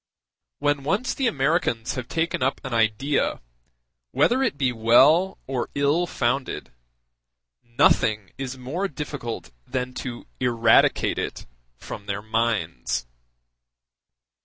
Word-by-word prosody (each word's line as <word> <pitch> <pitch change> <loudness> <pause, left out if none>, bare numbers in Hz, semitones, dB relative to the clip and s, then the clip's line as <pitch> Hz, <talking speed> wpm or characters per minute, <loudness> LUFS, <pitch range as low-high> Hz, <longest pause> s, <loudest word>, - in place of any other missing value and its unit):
When 145 -1 +1
once 195 - 0
the 265 - 0
Americans 135 - 0
have 125 -3 -5
taken 165 -2 -1
up 130 +1 +1
an 135 - -5
idea, 115 +5 +1 0.7
whether 250 - +2
it 245 - 0
be 130 -3 +1
well 135 +11 +4
or 130 -2 -3
ill 145 +5 +2
founded, 130 -2 -2 0.9
nothing 110 -3 +2
is 135 -1 -5
more 150 +10 -3
difficult 140 - -6 0.2
than 125 -1 -3
to 120 -2 -6
eradicate 115 -2 +3
it - - -4 0.3
from 100 +9 -9
their 100 0 -3
minds. 100 - -1
130 Hz, 110 wpm, -24 LUFS, 115-145 Hz, 0.9 s, well